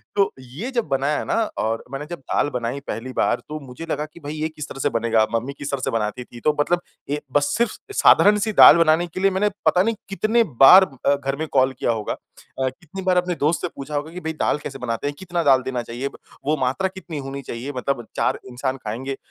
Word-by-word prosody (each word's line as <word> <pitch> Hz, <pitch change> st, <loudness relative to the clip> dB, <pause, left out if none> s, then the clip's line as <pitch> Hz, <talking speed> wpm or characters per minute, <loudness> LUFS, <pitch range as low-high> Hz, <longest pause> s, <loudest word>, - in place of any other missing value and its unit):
तो 200 Hz, -1 st, +3 dB
ये 140 Hz, -, -7 dB
जब 235 Hz, -3 st, 0 dB
बनाया 140 Hz, +2 st, 0 dB
ना -, -, 0 dB, 0.2 s
और 115 Hz, +1 st, -1 dB
मैंने 135 Hz, +2 st, -5 dB
जब 175 Hz, -, -5 dB
दाल 135 Hz, +2 st, 0 dB
बनाई 125 Hz, +1 st, -3 dB
पहली 130 Hz, +3 st, -5 dB
बार -, -, +1 dB
तो 155 Hz, 0 st, -4 dB
मुझे 125 Hz, +6 st, -8 dB
लगा 150 Hz, -, -1 dB
कि, 155 Hz, +2 st, -15 dB
"भई 145 Hz, -1 st, -6 dB
ये 155 Hz, 0 st, -2 dB
किस 150 Hz, -2 st, -8 dB
तरह 135 Hz, -, -8 dB
से 145 Hz, -, +1 dB
बनेगा, 115 Hz, -3 st, +2 dB
मम्मी 125 Hz, +5 st, -2 dB
किस 145 Hz, -, -4 dB
तरह 135 Hz, -2 st, -2 dB
से -, -, -1 dB
बनाती 110 Hz, +2 st, -2 dB
थी?" 120 Hz, 0 st, -13 dB
तो 150 Hz, -1 st, +2 dB
मतलब 175 Hz, +4 st, +2 dB, 0.3 s
ये 150 Hz, +1 st, -1 dB
बस 145 Hz, 0 st, +2 dB
सिर्फ़ 235 Hz, -2 st, 0 dB, 0.2 s
साधारण 210 Hz, -, +6 dB
सी 220 Hz, -, -1 dB
दाल 160 Hz, -, +9 dB
बनाने 165 Hz, +1 st, +3 dB
के 170 Hz, -, -7 dB
लिए 195 Hz, +1 st, +3 dB
मैंने 205 Hz, +3 st, +1 dB, 0.2 s
पता 180 Hz, -, +4 dB
नहीं 225 Hz, +2 st, 0 dB
कितने 220 Hz, +4 st, +2 dB, 0.2 s
बार 190 Hz, +7 st, +10 dB, 0.2 s
अ, 140 Hz, -, +5 dB
घर 135 Hz, -1 st, -3 dB
में 160 Hz, +3 st, -4 dB
कॉल 130 Hz, -1 st, +4 dB
किया -, -, +1 dB
होगा। 110 Hz, -2 st, -2 dB
अ, 130 Hz, -, -7 dB
कितनी 165 Hz, +8 st, -10 dB
बार 185 Hz, -1 st, +2 dB
अपने 180 Hz, 0 st, +1 dB
दोस्त 155 Hz, +2 st, +1 dB
से -, -, -1 dB
पूछा 140 Hz, +2 st, -6 dB
होगा 150 Hz, +2 st, -3 dB
कि, 180 Hz, -, -7 dB
"भई 160 Hz, 0 st, -3 dB
दाल 155 Hz, -, 0 dB
कैसे 135 Hz, -1 st, -6 dB
बनाते 115 Hz, +2 st, -2 dB
हैं? 145 Hz, -, -3 dB
कितना 175 Hz, -2 st, -2 dB
दाल 135 Hz, -3 st, +5 dB
देना 125 Hz, -2 st, -2 dB
चाहिए? 120 Hz, +4 st, -4 dB, 0.4 s
वो 150 Hz, +2 st, +2 dB
मात्रा 135 Hz, +8 st, 0 dB
कितनी 185 Hz, -4 st, -8 dB
होनी 135 Hz, 0 st, -6 dB
चाहिए? 130 Hz, +2 st, -6 dB
मतलब 125 Hz, -1 st, -2 dB
4 -, -, 0 dB
इंसान 130 Hz, +2 st, -3 dB
खाएँगे 130 Hz, +3 st, -4 dB
अ, -, -, -9 dB
145 Hz, 240 wpm, -22 LUFS, 130-175 Hz, 0.4 s, बार